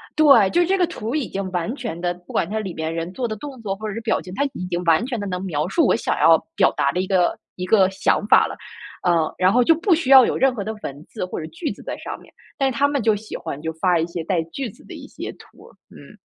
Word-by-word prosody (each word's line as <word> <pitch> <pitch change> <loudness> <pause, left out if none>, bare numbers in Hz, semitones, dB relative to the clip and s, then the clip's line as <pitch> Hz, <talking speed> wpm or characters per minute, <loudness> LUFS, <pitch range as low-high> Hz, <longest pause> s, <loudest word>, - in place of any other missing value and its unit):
对， 280 -10 +6
就 350 - +3
这 385 +3 +1
个 360 - +3
图 240 -6 -5
已 290 -7 -1
经 195 -1 -4
完 180 +7 -2
全 225 - -5
的 175 0 -1
不 175 0 -15
管 - - +1
它 220 +1 -2
里 195 -5 -5
面 160 0 -3
人 165 +1 -4
做 245 +4 -2
的 215 - -4
动 265 +4 -9
作 195 -2 -2
或 215 +2 -6
者 210 - -5
是 230 - -4
表 225 -1 0
情， 180 - -10
它 280 - +1
已 180 - -5
经 175 0 -2
完 165 +5 +4
全 245 -4 -3
的 205 - -4
能 180 -1 -4
描 155 -4 -2
述 325 - +2
我 - - +3
想 - - -1
要 - - +6 0.2
表 - - +4
达 - - +2
的 - - -2
一 185 - -4
个 185 -2 +2 0.2
一 180 - -4
个 190 -1 +4
想 195 +1 0
法 - - +6
了。 - - -7 0.5
呃， 165 -3 +2
然 185 +1 +4
后 245 +3 +4
就 325 +7 +5
不 345 +4 +2
需 310 -5 -1
要 265 -2 +10
有 - - -1
任 265 -1 +3
何 205 - -3
的 215 - -4
文 140 +2 -7
字 215 - -4
或 185 - -5
者 - - -5
句 160 +1 -4
子 200 - -10
在 - - -5
上 - - -6
面， - - -18 0.3
但 270 -2 +1
是 235 - -6
他 285 - +4
们 285 -2 -1
就 220 0 +3
喜 210 +1 -8
欢， 150 -4 -6
就 160 +1 -4
发 175 +1 +1
一 160 - +1
些 170 -1 -5
带 170 0 0
句 235 +10 -5
子 - - -17
的 - - -10
一 - - -10
些 - - -7
图 - - -18
儿， - - -18
嗯。 - - -15
195 Hz, 320 characters per minute, -22 LUFS, 175-250 Hz, 0.5 s, 要